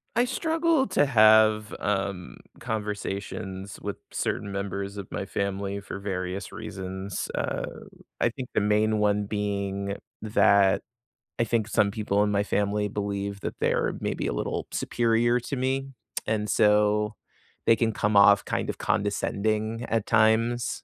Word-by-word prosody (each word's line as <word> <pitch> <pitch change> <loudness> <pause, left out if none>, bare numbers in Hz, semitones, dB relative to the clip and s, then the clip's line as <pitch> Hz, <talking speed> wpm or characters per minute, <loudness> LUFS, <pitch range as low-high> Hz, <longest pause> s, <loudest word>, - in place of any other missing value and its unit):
I 240 +2 +4
struggle 320 +2 +1
to 185 -6 +3
have, 110 -3 +5
um, 95 -3 -2 0.2
conversations 100 -3 -4
with - - -4
certain 100 -1 -2
members 100 0 -4
of 100 -2 -6
my 95 - -3
family 100 0 -2
for 100 0 -7
various 95 -1 -4
reasons, 95 -2 -5
uh, - - -2 0.5
I - - +3
think 125 +1 -7
the - - +2
main 105 +1 +2
one 105 0 +2
being 100 -1 -2 0.3
that 100 -2 +4 0.6
I - - +2
think 115 -1 0
some 105 -2 +2
people 105 -1 +1
in 105 - +1
my 100 0 +2
family 105 0 0
believe 100 -1 -3
that - - -5
they're - - +1
maybe - - -2
a - - -1
little - - -3
superior 120 +1 +2
to 140 - -4
me, 135 +1 -1 0.4
and 105 -1 -1
so 105 0 +3 0.5
they 115 - +6
can 115 0 +1
come 105 0 0
off 100 0 +7
kind - - -2
of - - -12
condescending 110 +3 -1
at 110 -2 0
times, 115 +2 +2
105 Hz, 145 wpm, -26 LUFS, 100-110 Hz, 0.6 s, off